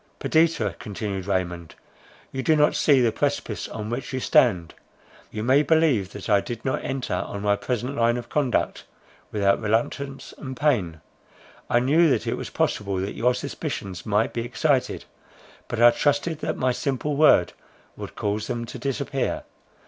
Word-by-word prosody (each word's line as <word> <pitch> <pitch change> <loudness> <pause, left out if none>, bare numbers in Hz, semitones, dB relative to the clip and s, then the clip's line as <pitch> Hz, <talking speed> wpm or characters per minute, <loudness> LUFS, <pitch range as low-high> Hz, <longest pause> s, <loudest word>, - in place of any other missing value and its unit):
"Perdita," 155 - +2
continued 100 -2 -5
Raymond, 85 -4 -2 0.6
"you 130 - -3
do 160 +3 +3
not 150 0 +4
see 140 -3 +4
the 120 -2 +3
precipice 140 -4 -2
on 110 0 -6
which 125 +3 -4
you 130 - -2
stand. 95 -10 +3 0.6
You 105 - -5
may 130 +4 +4
believe 150 - +2
that 100 - -7
I 100 -3 +4
did 120 0 -7
not 130 - -1
enter 135 -1 -3
on 100 0 -3
my 100 0 +3
present 125 +5 -3
line 120 0 +2
of 120 - -6
conduct 140 -5 0 0.5
without 100 -1 +2
reluctance 120 +6 -2
and 130 -3 -7
pain. 100 - 0 0.7
I 120 - +4
knew 155 +6 +4
that 135 - +1
it - - -1
was - - -5
possible 100 -2 -1
that 95 +2 -3
your 125 +1 +1
suspicions 95 -7 -5
might 105 +1 +1
be 115 - -2
excited; 130 +3 0 0.6
but 120 - -4
I 120 0 +8
trusted 145 +5 0
that - - -3
my 130 0 +1
simple 140 +3 -2
word 140 - +5 0.4
would - - -8
cause 105 +1 -2
them 120 0 -3
to - - -8
disappear. 135 -1 -2
120 Hz, 165 wpm, -24 LUFS, 105-140 Hz, 0.7 s, I